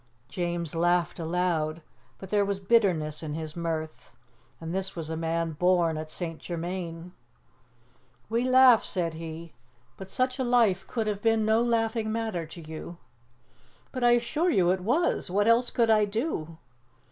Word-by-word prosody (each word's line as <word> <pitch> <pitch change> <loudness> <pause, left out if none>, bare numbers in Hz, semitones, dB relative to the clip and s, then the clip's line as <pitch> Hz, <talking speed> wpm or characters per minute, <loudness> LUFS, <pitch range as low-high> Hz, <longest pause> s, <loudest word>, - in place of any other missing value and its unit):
James 170 -1 -3
laughed 175 0 +1
aloud, 165 -2 -1 0.3
but 190 - -11
there 205 -1 +3
was 200 -1 -2
bitterness 185 -8 +2
in 150 -2 -5
his 155 -1 -5
mirth. 160 -6 -5 0.4
And 165 +1 -6
this 190 0 -2
was 160 -2 -4
a - - -2
man 165 0 -1
born 175 0 +2
at 155 0 -5
St. 165 0 -4
Germain! 170 0 -5 1.2
"We 230 +2 0
laugh," 255 -2 +6
said 170 -3 -1
he, 160 0 -8 0.4
"but 190 0 -9
such 255 +3 0
a - - +1
life 230 -6 +2
could 225 -3 -2
have 205 -1 -2
been 225 -1 +2
no 220 +1 +3
laughing 225 -2 0
matter 220 -7 -3
to 170 +2 -10
you." 160 +2 -8 0.9
"But 255 -2 -4
I 240 0 +6
assure 295 +9 +1
you 180 - +3
it 190 - 0
was! 260 - +1
What 205 +4 +1
else 235 +2 +4
could 230 -2 +2
I 215 -1 +4
do?" 200 - -3
180 Hz, 160 wpm, -27 LUFS, 165-225 Hz, 1.2 s, laugh